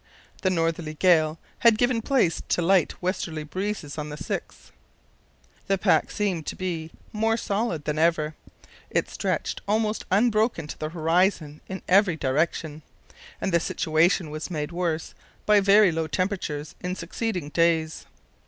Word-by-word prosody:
The 190 - +2
northerly 165 -3 -1
gale 160 -2 +3 0.2
had 230 -2 +5
given 245 0 +2
place 235 - +1
to 175 - +1
light 185 0 +2
westerly 170 -4 -2
breezes 175 -3 -4
on 150 0 -4
the 150 - -6
6th. 155 - -6 1.0
The 195 -1 +2
pack 185 0 +2
seemed 185 -7 -2
to - - -3
be 170 -4 -4 0.2
more 225 +1 +1
solid 200 -9 -2
than 150 0 -1
ever. 160 -2 +2 0.6
It - - -1
stretched - - -2
almost 215 +1 0
unbroken 215 -3 +2
to 150 - -8
the 155 - -3
horizon 165 -2 +1
in 190 0 -6
every 190 -2 +4
direction, 155 +2 -1 0.6
and 190 - -1
the 170 - +5
situation 160 +1 +1
was 155 +3 -5
made 150 -2 -3
worse 170 -2 -2 0.3
by 210 -1 +5
very 200 -1 +6
low 160 0 -2
temperatures 160 -4 -2
in 180 +1 -3
succeeding 180 -2 -3
days. 165 -1 +1
170 Hz, 145 wpm, -25 LUFS, 155-200 Hz, 1.0 s, very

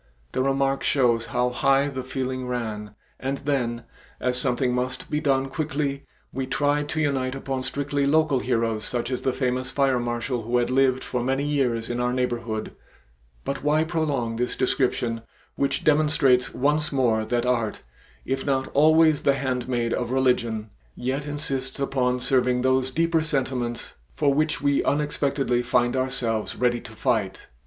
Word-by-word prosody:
The - - 0
remark 135 0 +1
shows 120 -4 +2
how 125 0 0
high 135 +3 +3
the 130 -2 -4
feeling 130 0 -3
ran, 110 -4 -4 0.2
and 135 +1 -2
then, 125 -5 -1 0.4
as 125 0 0
something 125 0 +1
must 125 +1 -3
be 150 - +1
done 135 -3 +1
quickly, 140 -1 -3 0.3
we 130 0 -3
tried 145 +2 0
to 160 - -1
unite 135 -4 0
upon 135 -1 -3
strictly 140 +1 -1
local 155 -2 +3
heroes 115 -3 0
such 120 0 -2
as 125 - -2
the 130 - +1
famous 130 0 -1
fire 135 -3 +2
marshal 120 +1 -2
who 120 +3 0
had 120 +1 +1
lived 130 0 +3
for 125 - -2
many 135 +3 0
years 125 -6 0
in 120 0 -3
our 125 0 0
neighborhood 120 -3 -2 0.7
but 140 0 -3
why 150 +2 +3
prolong 145 -9 -1
this 125 +1 -1
description 125 -3 0 0.3
which 140 - -1
demonstrates 150 -4 +3
once 150 +3 +1
more 120 -5 +2
that 120 +2 -1
art, 115 -4 0 0.4
if 135 0 -2
not 135 -2 0
always 155 +1 +5
the 140 - +3
handmaid 125 -3 -1
of 120 - -2
religion, 120 -4 +1 0.2
yet 135 +4 -3
insists 135 -3 -2
upon 125 -2 0
serving 125 -1 +2
those 130 0 +2
deeper 165 +3 +1
sentiments 130 -6 -2 0.2
for 135 - +1
which 150 +1 0
we 140 -1 +2
unexpectedly 140 -4 0
find 120 +1 +1
ourselves 125 -4 -1
ready 120 -1 +1
to 110 - -11
fight. 105 -3 -1
130 Hz, 160 wpm, -25 LUFS, 120-140 Hz, 0.7 s, always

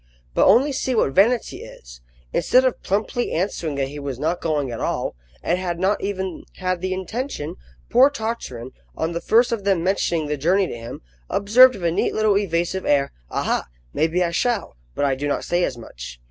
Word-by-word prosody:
But - - +4
only 245 +9 +5
see 260 -1 -1
what 175 - +2
vanity 225 - +3
is! - - -12 0.3
Instead 255 +1 +4
of 255 - 0
plumply 215 +5 -1
answering 165 -3 -2
that 135 -1 -1
he 145 +1 -7
was 140 -3 -4
not 160 +6 -1
going 150 -5 -1
at 115 - -5
all, - - -2 0.3
and 175 +2 +1
had 175 -2 -2
not 195 +3 +1
even 190 -3 -3
had 185 -2 -2
the 185 0 -2
intention, 190 - -4 0.3
poor 255 +4 +6
Tartarin, 220 - -5 0.3
on 160 +1 -1
the 170 0 -3
first 235 +2 +3
of 225 -4 -2
them 195 -4 +1
mentioning 175 -4 0
the 150 0 -2
journey 185 +7 +2
to - - -5
him, 115 0 -8 0.3
observed 250 +6 +6
with 190 - -9
a 170 - +2
neat - - 0
little 215 -2 +3
evasive 185 -1 0
air, 140 -1 +2 0.2
"Aha! - - -1 0.3
maybe 165 +3 +1
I 170 - -1
shall 225 - -1 0.2
but - - +1
I 140 - +2
do 140 +2 -3
not 145 - -1
say 175 +1 0
as 130 - -1
much." - - -10
180 Hz, 200 wpm, -22 LUFS, 145-210 Hz, 0.3 s, poor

